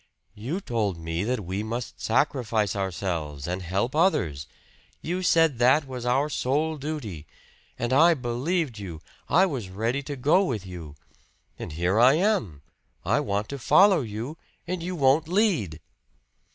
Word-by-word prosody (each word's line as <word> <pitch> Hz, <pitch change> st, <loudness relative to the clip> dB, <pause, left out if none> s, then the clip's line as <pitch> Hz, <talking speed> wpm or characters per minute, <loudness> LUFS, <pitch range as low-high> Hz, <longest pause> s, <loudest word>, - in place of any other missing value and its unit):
"You 130 Hz, -, -4 dB
told 110 Hz, -, -1 dB
me 85 Hz, +2 st, -3 dB
that 120 Hz, -4 st, -2 dB
we 95 Hz, +3 st, -3 dB
must 115 Hz, +2 st, -5 dB
sacrifice 115 Hz, -5 st, +1 dB
ourselves, 85 Hz, -7 st, -3 dB
and 90 Hz, +2 st, -3 dB
help 100 Hz, -, -2 dB
others! 85 Hz, -, +1 dB, 0.5 s
You 180 Hz, +3 st, -3 dB
said 165 Hz, -7 st, +3 dB
that 130 Hz, +5 st, +4 dB
was 125 Hz, -2 st, -6 dB
our 135 Hz, +4 st, +2 dB
sole 150 Hz, +3 st, -1 dB
duty! 130 Hz, -, -6 dB, 0.5 s
And 120 Hz, +2 st, -1 dB
I 165 Hz, +5 st, +6 dB
believed 130 Hz, -, -2 dB
you 90 Hz, -6 st, -7 dB, 0.3 s
I 180 Hz, +6 st, +5 dB
was 130 Hz, -, -4 dB
ready 115 Hz, +8 st, -1 dB
to 140 Hz, +1 st, -6 dB
go 150 Hz, +9 st, +3 dB
with 110 Hz, -, -3 dB
you. 85 Hz, -5 st, -9 dB, 0.6 s
And 85 Hz, -, -6 dB
here 90 Hz, +6 st, +1 dB
I 125 Hz, +3 st, +7 dB
am 170 Hz, -, 0 dB, 0.4 s
I -, -, +2 dB
want 100 Hz, +1 st, -1 dB
to 140 Hz, -, -5 dB
follow 190 Hz, +6 st, +5 dB
you, 120 Hz, +7 st, -6 dB, 0.3 s
and 180 Hz, 0 st, -3 dB
you 180 Hz, +2 st, -4 dB
won't 145 Hz, +1 st, +3 dB
lead!" 170 Hz, -, +1 dB
120 Hz, 150 wpm, -26 LUFS, 95-155 Hz, 0.6 s, I